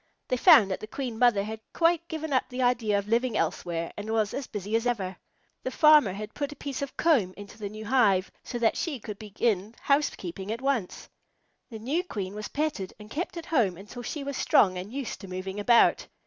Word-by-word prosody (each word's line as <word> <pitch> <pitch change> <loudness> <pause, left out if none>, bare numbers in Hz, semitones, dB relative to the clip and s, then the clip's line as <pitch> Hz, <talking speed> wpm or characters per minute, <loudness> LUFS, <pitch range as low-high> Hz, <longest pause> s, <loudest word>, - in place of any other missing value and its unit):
They - - +2
found 205 -4 +7
that 190 - -2
the 215 - -8
Queen 240 -2 -5
Mother 240 -5 +4
had 220 +1 -6
quite 335 0 +2
given 315 -3 -4
up 260 - +1
the 255 0 -2
idea 235 -4 +2
of 200 0 -3
living 230 0 +1
elsewhere 165 +1 -2
and 205 +1 -6
was 220 -2 +1
as 275 - -4
busy 210 0 -3
as 230 +2 +1
ever. 195 -6 -1 0.5
The - - -3
farmer 300 - +6
had 210 +2 -7
put 285 0 -3
a - - -8
piece 275 -1 -5
of 280 -2 -5
comb 240 - +2
into 205 +1 -11
the 205 -2 -4
new 215 +1 -8
hive 205 -6 +3
so 240 - -5
that 230 -2 +2
she 300 -7 -2
could 210 -1 -8
begin 215 0 -1
housekeeping 200 - -1
at 230 - -3
once. 265 -8 -2 0.6
The 225 - -7
new 275 +11 -1
Queen 200 - -5
was 210 0 -5
petted 290 -11 -3
and 210 +1 -12
kept 350 +3 -4
at 335 - -6
home 220 - +1
until 210 +6 -9
she 280 +5 -5
was 280 -1 -4
strong 185 -3 +4
and 185 +3 -6
used 270 -2 -5
to 195 - -9
moving 185 +2 -5
about. 235 +3 +4
225 Hz, 220 wpm, -27 LUFS, 200-270 Hz, 0.6 s, found